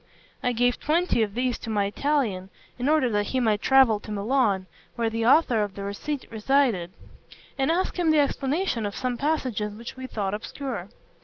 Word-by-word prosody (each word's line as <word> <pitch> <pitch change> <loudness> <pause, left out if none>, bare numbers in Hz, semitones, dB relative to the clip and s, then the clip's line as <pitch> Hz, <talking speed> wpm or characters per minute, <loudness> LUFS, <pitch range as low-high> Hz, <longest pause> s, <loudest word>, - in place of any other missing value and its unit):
I 250 - +1
gave 245 +1 +1
twenty 325 -4 +1
of 210 -2 -1
these 250 0 0
to - - -7
my 205 -2 +1
Italian, 210 -5 -1 0.3
in 255 +4 0
order 305 -4 +3
that 205 -1 0
he 260 - 0
might 220 -4 +1
travel 265 -6 +5
to - - -12
Milan, 210 -2 +1 0.3
where 230 -2 0
the 225 0 0
author 255 -5 +4
of 205 -2 -3
the 200 - -6
receipt 255 +8 -4
resided, 225 -6 +1 0.6
and 270 +1 0
ask 360 +2 0
him 340 -2 +2
the 310 - +4
explanation 280 - 0
of 200 - -7
some 250 -1 -2
passages 245 -7 -1
which 235 +2 -8
we 260 0 -7
thought 200 -5 -3
obscure. 215 -2 -5
240 Hz, 185 wpm, -25 LUFS, 210-275 Hz, 0.6 s, travel